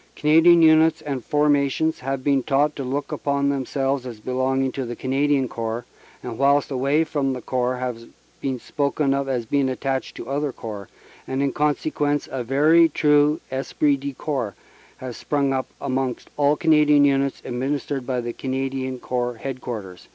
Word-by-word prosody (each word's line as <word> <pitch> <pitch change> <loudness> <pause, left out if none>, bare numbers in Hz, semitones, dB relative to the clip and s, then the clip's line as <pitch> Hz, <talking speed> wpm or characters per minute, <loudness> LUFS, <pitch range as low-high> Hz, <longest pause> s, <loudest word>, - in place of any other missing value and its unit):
Canadian 165 +3 +5
Units 160 0 +5
and 135 -4 -4
Formations 145 +2 +1
have 135 0 -3
been 140 -1 +2
taught 145 +3 +1
to 140 - -4
look 140 +3 -3
upon 140 0 0
them 135 -2 -2
selves 135 -1 -1
as 115 -3 -8
belonging 130 +3 0
to 135 - -4
the 120 -1 -5
Canadian 135 +1 +1
Corps, 115 0 -4 0.4
and 120 -2 -6
whilst 140 +1 +3
away 140 +4 +2
from 145 -4 -1
the 130 - -4
Corps 125 0 -1
have 125 -2 -4 0.4
been 130 -2 -2
spoken 140 +1 0
of 140 0 -1
as 125 -3 -1
being 135 +3 +1
attached 130 0 -3
to - - -7
other 145 +1 -1
Corps; 105 -5 -8 0.4
and 130 +1 -1
in 140 - 0
consequence 145 -1 0
a 130 -2 -3
very 155 +7 +4
true 150 0 +3
esprit 140 +2 +1
de 140 +1 -5
corps 125 - -3 0.4
has 130 -2 -7
sprung 140 -2 0
up 130 0 -1
amongst 130 -2 -3
all 145 0 +3
Canadian 150 -2 +4
Units 140 -1 +1
administered 135 +1 -3
by 125 -2 -1
the 120 0 -4
Canadian 130 0 -3
Corps 125 -1 -2
Headquarters." 115 -8 -6
135 Hz, 165 wpm, -23 LUFS, 130-145 Hz, 0.4 s, Canadian